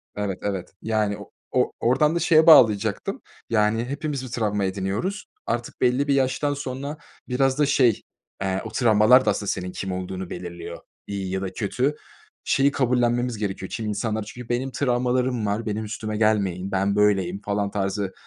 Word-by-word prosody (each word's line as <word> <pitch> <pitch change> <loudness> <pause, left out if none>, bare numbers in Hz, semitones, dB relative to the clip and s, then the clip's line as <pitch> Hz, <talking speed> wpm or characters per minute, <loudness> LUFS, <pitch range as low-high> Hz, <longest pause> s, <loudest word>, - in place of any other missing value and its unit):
Evet, 100 -3 -2
evet. 100 -3 -4
Yani 105 -2 0
o 100 - -12 0.2
o 125 - +2
oradan 140 +7 +2
da - - +1
şeye 160 -2 +4
bağlayacaktım. 110 -10 +5 0.3
Yani, 115 +1 +2
hepimiz 145 0 -3
bir - - -8
travma 105 -4 0
ediniyoruz. 100 - -2 0.2
Artık 120 0 -3
belli 130 +3 +2
bir 140 - +3
yaştan 135 +2 +1
sonra 140 +1 -5 0.3
biraz 135 +2 +1
da 150 - +5
şey, 130 -6 +3 0.4
eee, 95 0 -1
o - - -4
travmalar 120 +2 +5
da - - +3
aslında 100 - -4
senin 90 -1 -3
kim 95 +1 -4
olduğunu 95 0 -5
belirliyor, 85 -1 -7 0.3
iyi 95 -2 -4
ya 95 - -2
da 95 -1 -4
kötü. 125 +9 -1 0.5
Şeyi 140 +1 +3
kabullenmemiz 120 -2 +1
gerekiyor, 95 -2 -4
kimi 110 -1 -4
insanlar 110 +1 -2
çünkü 120 +3 -10
benim 125 +2 -1
travmalarım 125 -2 0
var, 105 +3 -1
benim 110 +1 -2
üstüme 110 0 -4
gelmeyin, 100 -4 +1
ben 95 +1 +1
böyleyim 100 -2 +2
falan 100 -1 -1
tarzı 100 -1 -2
110 Hz, 165 wpm, -24 LUFS, 100-130 Hz, 0.5 s, bağlayacaktım